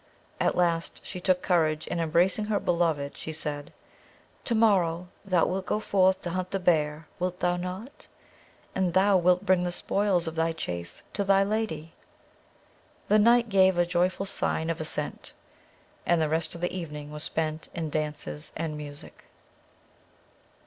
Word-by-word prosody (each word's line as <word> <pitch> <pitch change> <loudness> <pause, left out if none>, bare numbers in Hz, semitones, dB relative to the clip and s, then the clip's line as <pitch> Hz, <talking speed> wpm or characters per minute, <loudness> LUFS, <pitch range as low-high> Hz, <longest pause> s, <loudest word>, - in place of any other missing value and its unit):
At - - +2
last 170 -2 0
she 185 - -6
took 185 0 +2
courage, 160 -4 +1
and 170 - 0
embracing 175 +6 +2
her 210 -1 0
beloved, 165 -5 0
she 160 - -6
said: 150 -2 -3 0.7
"To 235 - +1
morrow 180 -6 +2
thou 185 -4 +2
wilt 190 +1 -2
go 210 - +1
forth 190 -3 +2
to 175 - -3
hunt 185 +1 -2
the 195 - -2
bear, 155 -3 +1
wilt 180 0 -2
thou 175 0 +2
not? 185 +8 -6 0.7
and 185 -3 0
thou 195 +1 +5
wilt 180 +2 +3
bring 185 -2 +4
the 180 0 -1
spoils 190 -1 +1
of 160 - -1
the 165 0 0
chase 85 - -5
to 200 - 0
thy 195 0 +4
lady?" 195 -7 -2 1.2
The 215 - +6
knight 235 +2 +5
gave 190 -2 +4
a 175 - +4
joyful 180 +2 0
sign 165 -4 0
of 165 - -4
assent; 155 - -4 0.7
and 170 -1 +2
the 155 -1 +1
rest 160 +1 -1
of 170 - -9
the 175 - -1
evening 150 -4 -6
was 150 0 -6
spent 155 0 -2
in 160 -3 -3
dances 150 - -4
and 160 -2 -3
music. 145 -1 -10
175 Hz, 165 wpm, -27 LUFS, 160-190 Hz, 1.2 s, The